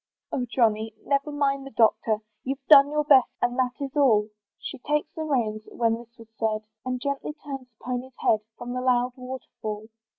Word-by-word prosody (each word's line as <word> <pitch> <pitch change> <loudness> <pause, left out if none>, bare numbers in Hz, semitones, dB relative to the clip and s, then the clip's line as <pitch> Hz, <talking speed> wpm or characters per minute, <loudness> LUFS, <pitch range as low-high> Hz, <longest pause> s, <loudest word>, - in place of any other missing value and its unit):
"Oh! 250 -2 -1
Johnny, 220 -2 +1
never 280 +1 +1
mind 275 -1 0
the 275 - -8
Doctor; 220 -2 +2 0.2
"You've 270 +2 -4
done 285 -2 +9
your 300 0 +1
best, 275 -4 +6
and 245 0 +1
that 250 -1 0
is 280 0 -5
all." 225 -7 +4 0.3
She 280 - -7
took 295 +3 0
the 320 - -5
reins, 230 -7 0
when 230 -1 +1
this 235 0 -15
was 225 -1 -14
said, 215 -1 0 0.2
And 255 0 -2
gently 280 +2 -3
turned 275 -4 -8
the 230 -3 -30
pony's 250 +1 -4
head 215 - +3 0.2
From 245 0 -6
the 250 - -2
loud 250 -1 +2
water 255 0 -7 0.2
fall. 215 0 -4
250 Hz, 195 wpm, -26 LUFS, 230-275 Hz, 0.3 s, done